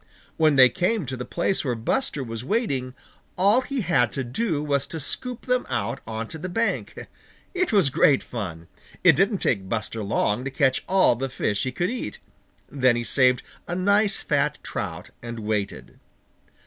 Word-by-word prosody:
When 155 -2 +3
they 130 -1 +9
came 185 - 0
to 130 +1 -3
the 125 0 -6
place 180 +2 0
where 125 -4 -1
Buster 145 - -1
was 115 -1 -6
waiting, 135 - -1 0.4
all 200 +7 +4
he 265 0 -3
had 150 - +2
to 135 - -2
do 150 - -1
was 140 -2 0
to 160 - -5
scoop 250 - -3
them 250 0 +1
out 120 -2 -2
on 110 0 -4
to 160 - -8
the 185 - -5
bank. 225 +6 -2 0.5
It 365 -1 0
was 190 -10 +4
great 135 +1 +4
fun. 85 -8 -6 0.4
It 180 - +9
didn't 195 +4 +1
take 95 -4 0
Buster 110 +1 -2
long 105 +2 0
to 135 - -3
catch 135 -1 +1
all 190 -9 +4
the 135 +3 -3
fish 105 -5 -1
he 130 - -1
could 175 - -1
eat. 250 - -5 0.5
Then 130 -3 +2
he 120 - -2
saved 125 0 +3 0.2
a 175 - -3
nice 200 +3 +2
fat - - 0
trout - - -5
and 120 -1 -6
waited. 105 -2 -3
135 Hz, 180 wpm, -24 LUFS, 120-190 Hz, 0.5 s, they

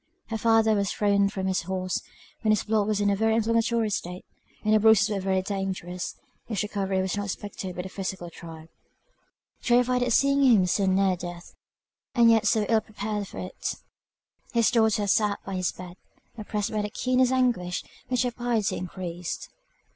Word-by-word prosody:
Her 225 - -2
father 225 0 +4
was 200 -2 0
thrown 200 -1 +2
from 190 -2 -4
his 190 -1 0
horse, 185 +1 -2 0.4
when 215 - +2
his 215 - +2
blood 215 -1 +1
was 215 -1 0
in 205 0 +2
a - - +2
very 220 +2 +2
inflammatory 230 0 +1
state, 180 -1 -4 0.4
and 215 - +3
the 215 - +5
bruises 215 -1 +5
were 200 - -1
very 190 0 0
dangerous; 190 -3 -4 0.3
his 215 -3 -1
recovery 195 -2 -1
was 190 - -2
not 205 0 -3
expected 195 -2 -6
by 180 - -4
the 190 - -7
physical 185 -3 -5
tribe. 160 -1 -11 0.9
Terrified 250 +1 +3
at 245 0 +1
seeing 275 +3 +3
him 230 -9 +5
so 190 +2 +1
near 190 0 +3
death, 175 -1 -8 0.6
and 235 -2 +6
yet 225 -2 +3
so 215 +1 +3
ill 225 -1 +3
prepared 210 -1 -4
for - - -11
it, 185 - -4 0.8
his 230 -2 +3
daughter 220 -3 +3
sat 205 0 +2
by 195 - -5
his 185 -1 0
bed, 180 0 -10 0.4
oppressed 210 -2 -3
by 215 -1 -1
the 210 - -3
keenest 255 +3 +1
anguish, 240 -9 0 0.2
which 250 0 +1
her 245 - -1
piety 235 -4 -1
increased. 180 -1 -5
205 Hz, 180 wpm, -26 LUFS, 190-225 Hz, 0.9 s, and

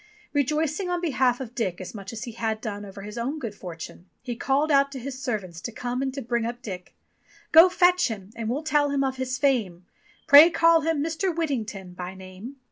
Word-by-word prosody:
Rejoicing 305 +5 0
on 355 0 0
behalf 260 -7 +1
of 245 -3 -7
Dick 195 -8 -2
as 185 - -7
much 200 -2 -8
as 230 -1 -6
he 240 - -6
had 225 -1 -2
done 205 -3 -5
over 195 0 -10
his 210 +3 -7
own 265 +6 -2
good 235 -8 -5
fortune, 175 -1 -9
he 245 -2 -4
called 280 +5 +1
out 275 0 +4
to 265 - -5
his 260 +1 -7
servants 200 - -4
to 235 - -5
come 245 +3 -3
and 270 -1 -1
to 275 - -4
bring 235 0 -1
up 240 +2 -5
Dick: 185 -5 -8 0.6
"Go 335 +3 +9
fetch 360 0 +4
him, 205 -4 -7
and 230 -1 -4
we'll 275 +6 -2
tell 295 -2 +2
him 280 -1 +1
of 265 -1 -2
his 260 0 -2
fame; 220 -11 0 0.4
Pray 290 +4 +9
call 330 -1 +4
him 315 -2 0
Mr. 330 +4 -1
Whittington 215 - -3
by 180 +1 -7
name." 190 +7 -10
245 Hz, 215 wpm, -25 LUFS, 210-290 Hz, 0.6 s, Go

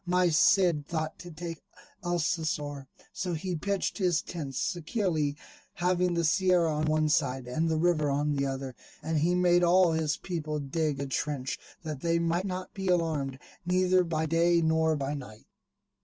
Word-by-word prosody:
My 180 0 +3
Cid 165 -2 +3
thought 155 -1 -3
to 175 - -9
take 165 0 -7 0.4
Alcocer: 155 -5 -1 0.3
so 180 -2 -3
he 180 +3 -3
pitched 200 +6 -2
his 180 -4 +2
tents 145 -6 -6
securely, 170 -5 -1 0.4
having 180 0 +1
the 170 - +1
Sierra 170 0 +3
on 150 +1 0
one 155 0 +2
side, 130 -4 +1
and 160 +6 0
the 160 - +1
river 155 -3 +2
on 145 +1 0
the 140 0 0
other, 135 -1 -4 0.3
and 160 0 0
he 175 +4 +2
made 175 0 +4
all 175 0 +5
his 160 -1 0
people 155 -4 -4
dig 145 +1 -1
a 140 - -2
trench, 135 -1 -3 0.2
that 155 -4 -5
they 170 0 +1
might 170 +2 0
not 185 -1 -5
be 195 -1 -4
alarmed, 160 -7 0 0.3
neither 185 +1 +3
by 160 -2 -1
day 170 +2 +3
nor 160 -1 +2
by 140 0 -2
night. 125 -7 -9
160 Hz, 170 wpm, -29 LUFS, 150-175 Hz, 0.4 s, all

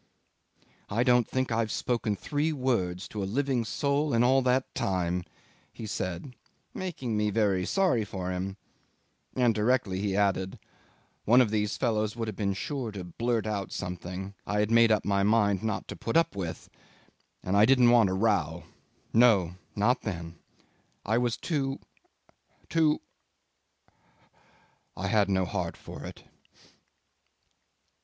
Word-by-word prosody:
"I 115 +4 +1
don't 125 -2 +4
think 130 -1 -1
I've 115 -1 0
spoken 115 -4 -1
three 150 +8 -1
words 110 - -1
to 105 - -5
a - - -1
living 135 +1 0
soul 140 +4 0
in 115 - +4
all 130 +2 +4
that 130 +1 +1
time," 90 -7 -1 0.5
he 115 - -8
said, 95 +3 -4 0.4
making 140 -11 -4
me 105 0 +1
very 100 -3 +1
sorry 185 - +2
for 95 -2 -4
him; 95 +2 -4 0.8
and 125 -3 +3
directly 105 -3 +1
he 100 -1 -1
added, 95 -2 0 0.7
"One 120 +4 +6
of 120 -5 +3
these 105 -1 0
fellows 110 -4 0
would 115 -1 -3
have 110 - -4
been 100 -2 -1
sure 135 - -3
to 95 -3 -6
blurt 115 +6 -1
out 100 -3 -3
something 90 +1 -5
I 105 - 0
had 105 +1 0
made 115 -1 +6
up 110 - +2
my 100 -1 +2
mind 100 -2 +3
not 110 -2 -2
to - - -5
put 115 - -1
up 165 - +2
with, 90 -4 -5 0.8
and 95 - -1
I 105 +1 +7
didn't 125 -1 +5
want 115 -5 +5
a - - -1
row. 95 -6 +1 0.5
No! 110 -7 +5 0.2
Not 125 +5 +2
then. 85 -4 -6 0.7
I 110 +3 +2
was 120 -2 0
too 140 -5 -2 0.9
too... 160 -2 +2 2.0
I 95 +1 -2
had 105 -1 +3
no 95 -1 +2
heart - - -3
for - - -10
it." - - -10
110 Hz, 150 wpm, -28 LUFS, 95-125 Hz, 2.0 s, I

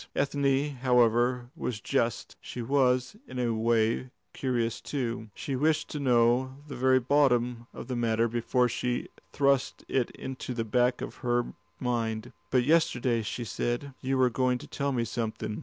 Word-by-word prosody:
Ethne, 140 0 +1
however, 125 0 +3
was 125 -9 -3
just; - - -1
she - - -8
was 125 - +2
in - - -8
a 120 -2 +1
way 115 +2 +1 0.2
curious 120 -4 -1
too: 115 -5 -3
she 135 - -3
wished 155 +3 +1
to 150 - -4
know 125 0 +3
the 145 - -7
very 130 +1 +4
bottom 125 -3 +2
of - - -9
the 130 - -3
matter 115 -1 +2
before 120 +2 +1
she 120 +1 -2 0.2
thrust 140 -2 +1
it 130 -3 +1
into 130 -1 -6
the 115 -1 -1
back 125 +2 +2
of - - -6
her 120 -1 0 0.3
mind. 115 -3 -2 0.2
"But 125 - +3
yesterday," 125 -6 +2
she 115 +3 -4
said, 120 +5 -2
"you 135 +1 0
were 130 -1 +4
going 125 +1 +1
to - - -11
tell 140 0 -2
me 120 -3 0
something. 110 -2 -3
125 Hz, 160 wpm, -29 LUFS, 120-130 Hz, 0.3 s, very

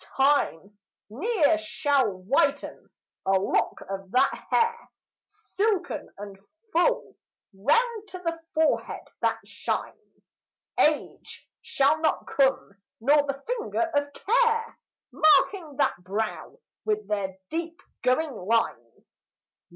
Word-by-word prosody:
Time 210 - +1 0.3
ne'er 325 - +2
shall 285 -6 +1
whiten 195 +9 -1 0.4
a 195 - +3
lock 190 0 +1
of 195 -1 -6
that 260 +6 +3 0.2
hair, 465 +1 +1 0.4
Silken 400 -6 -2
and 200 -1 -9 0.3
full, - - +1 0.4
round 425 - +1
the 335 -3 -4 0.2
forehead, 315 0 0
that - - +1
shines. - - -5 0.6
Age 300 -1 0
shall 280 +3 +2
not 320 - +1
come, 265 -8 0 0.2
nor 285 +6 +4
the 275 0 -4
finger 455 -8 -2
of 285 0 0
care, 460 0 +1 0.3
Marking 310 0 +3
that 285 - +2
brow 200 +5 -4 0.3
with 425 0 -1
their 195 -2 -2
deep 335 +1 -4 0.2
going 270 +5 +1
lines. 190 - -2
290 Hz, 105 wpm, -26 LUFS, 220-365 Hz, 0.6 s, nor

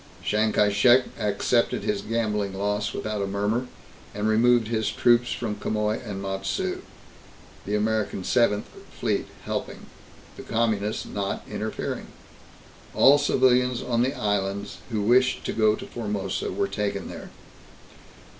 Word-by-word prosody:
Chiang 110 +1 +1
Kai 105 -1 +3
Shek 120 +5 +5 0.2
accepted 105 +3 +1
his 105 -1 -1
gambling 105 -3 -1
loss 105 +1 -1
without 105 -1 -3
a 100 - -1
murmur 105 +5 -1 0.5
and 105 +1 -1
removed 115 +1 +4
his 110 -1 0
troops 120 0 +3
from 110 -3 -2
Quemoy 105 0 -1
and 100 -4 -5
Matsu, 95 0 -2 0.9
the 105 - 0
American 105 -2 0
Seventh 105 -1 +2 0.3
Fleet - - 0 0.2
helping, - - -4 0.5
the - - -7
Communists 110 -2 -1
not 100 -1 -3
interfering. - - -4 0.9
All 145 +2 +7
civilians 125 -3 +3
on 120 -1 0
the 130 +3 0
islands 100 -1 -2
who 110 -3 -1
wished 125 +4 +3
to - - -2
go 110 -1 +3
to - - -8
Formosa 105 -5 -3
were 100 +1 0
taken 100 -1 -3
there. - - -8
105 Hz, 135 wpm, -25 LUFS, 100-120 Hz, 0.9 s, All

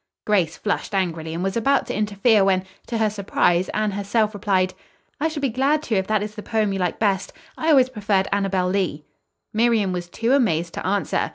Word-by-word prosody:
Grace 185 -6 +1
flushed 205 0 -2
angrily 165 -4 -1
and 170 +2 -3
was 195 0 -1
about 275 +4 +2
to - - -4
interfere 210 +1 +3
when, 190 -1 +2 0.2
to 235 - -2
her 220 -1 +2
surprise, 190 -3 +1
Anne 215 -1 -1
herself 210 +2 0
replied: 190 -2 0 0.5
"I 310 - +1
shall 310 -2 -4
be 275 - +1
glad 275 +6 +1
to 230 - -1
if 190 -1 0
that 215 -1 +1
is 210 0 -6
the 210 - -7
poem 215 -2 0
you 195 - -2
like 180 -2 -1
best. 200 -3 0 0.2
I 320 - -1
always 265 -4 +5
preferred 200 -4 0
'Annabel 195 -2 0
Lee.'" 180 -6 -1 0.5
Miriam 220 -3 +2
was 175 -1 -5
too 230 +7 0
amazed 170 - +1
to - - -4
answer. 200 +1 0
205 Hz, 205 wpm, -22 LUFS, 190-225 Hz, 0.5 s, always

